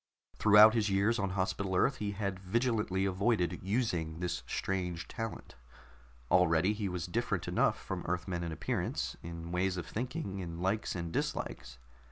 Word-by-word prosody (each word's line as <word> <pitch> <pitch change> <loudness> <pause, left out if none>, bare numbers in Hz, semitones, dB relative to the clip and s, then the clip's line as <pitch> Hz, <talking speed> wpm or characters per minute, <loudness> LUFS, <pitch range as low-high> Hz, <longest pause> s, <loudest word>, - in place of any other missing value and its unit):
Throughout 110 +1 +8
his 110 -3 +1
years 100 +4 +2
on 100 -1 0
Hospital 95 0 -1
Earth 130 +8 +3
he 100 -1 -2
had 100 -2 -3
vigilantly 105 -1 0
avoided 95 -2 +1
using 90 -6 -1
this 85 -9 -2
strange 90 -1 -2
talent. 115 -1 -6 0.8
Already 90 +2 +4
he 105 -2 -2
was 90 -2 -3
different 85 - -1
enough - - +2
from - - -5
Earthmen 90 0 -2
in 85 - -3
appearance, 80 - -2
in 85 0 -7
ways 90 +1 0
of 85 - -4
thinking, 105 -4 -4
in 85 -2 -5
likes 95 +4 -1
and 85 -2 -4
dislikes. 65 0 -3
95 Hz, 155 wpm, -32 LUFS, 85-105 Hz, 0.8 s, Throughout